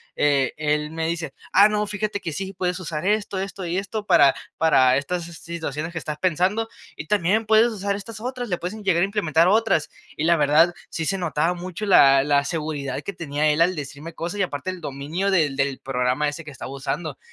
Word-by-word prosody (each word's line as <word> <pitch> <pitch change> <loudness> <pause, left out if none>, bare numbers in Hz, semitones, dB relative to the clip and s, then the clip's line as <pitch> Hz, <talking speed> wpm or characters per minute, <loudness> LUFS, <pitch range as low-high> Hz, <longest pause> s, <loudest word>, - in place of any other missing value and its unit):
eh, 140 -3 +2
él 150 0 0
me 160 0 -3
dice: 170 0 -4 0.2
"Ah, 200 +2 +7
no, 210 0 0
fíjate 210 0 -3
que 165 - -3
sí 195 +3 -5
puedes 180 0 -2
usar 165 -1 -4
esto, 205 -1 0
esto 195 0 -5
y 170 +2 -2
esto 205 +1 -4
para 140 -6 +6 0.2
para 130 -5 +4
estas 170 +5 -3
si 170 - -10
situaciones 165 -2 -5
que 170 - -7
estás 150 -2 -4
pensando, 185 +7 0 0.3
y 155 - -8
también 210 +4 +2
puedes 220 +2 +5
usar 200 -3 -2
estas 215 +2 -9
otras, 250 0 -4
le 180 -4 -1
puedes 180 +4 -5
en 215 -1 -9
llegar 175 -3 +2
a - - +4
implementar 170 -5 +2
otras". 215 -7 +2 0.3
Y 150 - -2
la 170 0 +4
verdad, 155 +4 +4 0.2
sí 165 - -3
se 195 +2 0
notaba 165 0 0
mucho 180 +3 -6
la 135 -8 +6
la 140 -1 +2
seguridad 150 -5 -3
que 200 - -5
tenía 155 -3 -1
él 150 +3 +1
al 180 +2 +3
decirme 150 +2 -7
cosas 175 +5 -4
y - - +3
aparte 145 +1 -3
el 180 -2 -9
dominio 150 +7 -3
del 155 -7 +2
del 135 -1 -1
programa 130 +2 0
ese 155 +3 -7
que 150 - -9
estaba 130 -1 -8
usando. 140 +2 -4
170 Hz, 220 wpm, -23 LUFS, 150-195 Hz, 0.3 s, Ah